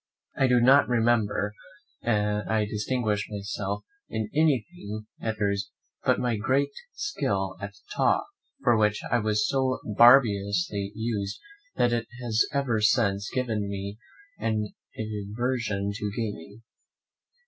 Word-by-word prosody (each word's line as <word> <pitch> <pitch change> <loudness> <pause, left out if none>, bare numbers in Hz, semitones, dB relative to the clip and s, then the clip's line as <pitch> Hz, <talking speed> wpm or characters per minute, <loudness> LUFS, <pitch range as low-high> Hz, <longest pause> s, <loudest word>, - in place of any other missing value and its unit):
I 135 - +3
do 125 -1 +4
not 135 +4 +6
remember 110 -3 +2 0.5
that 105 -2 0
I 110 -1 +2
distinguished 105 0 -1
myself 100 0 -4 0.3
in 110 -1 -3
anything 140 -7 0 0.2
at 110 -1 -1
those - - -21
years 100 -1 0 0.3
but - - +3
by - - -3
my 120 -3 +1
great 135 +6 +1 0.2
skill 100 - -1
at 100 0 -6 0.2
taw, - - +3 0.4
for 120 - +5
which 105 -1 +2
I 120 - +4
was 105 -1 +1
so 130 -1 +1
barbarously 100 -4 +4
used 105 -3 -2 0.4
that 120 0 +2
it 115 -1 -1
has 115 -2 +2
ever 130 -6 0
since 105 -2 +2
given 110 -6 -1
me 100 +2 -5 0.4
an 110 -2 -1 0.2
aversion 105 0 -2
to 105 0 -3
gaming. 105 -1 -5
110 Hz, 130 wpm, -27 LUFS, 100-120 Hz, 0.5 s, not